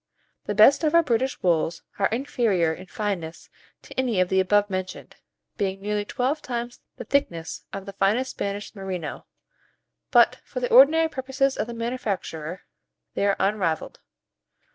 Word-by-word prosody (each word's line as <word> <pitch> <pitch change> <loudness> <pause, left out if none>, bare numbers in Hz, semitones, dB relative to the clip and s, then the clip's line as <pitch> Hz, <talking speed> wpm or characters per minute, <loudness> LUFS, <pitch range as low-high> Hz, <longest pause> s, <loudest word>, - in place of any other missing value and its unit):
The 205 - -2
best 270 +9 +6
of 310 +1 +2
our 335 - +6
British 255 -1 -1
wools 165 -1 +1 0.2
are 195 - +4
inferior 220 - 0
in 185 +3 -11
fineness 185 -6 -4 0.3
to - - -12
any 240 -7 +1
of 185 -1 +2
the 190 - +2
above 205 +2 +3
mentioned, 185 -1 -5 0.4
being 195 -1 -1
nearly 205 +1 -2
twelve 265 +8 -1
times 240 -3 -5 0.2
the - - -6
thickness 180 -11 -2
of 195 -1 -6
the 200 - -8
finest 215 +7 +1
Spanish 200 +1 -4
merino; 185 -6 -6 0.8
but - - +5
for - - -6
the 245 - -2
ordinary 310 +6 +7
purposes 270 -2 -1
of 210 - -2
the 235 - -6
manufacturer, 200 -8 -4 0.5
they 200 - 0
are 200 - +3
unrivalled. 190 -5 -1
205 Hz, 155 wpm, -25 LUFS, 190-255 Hz, 0.8 s, ordinary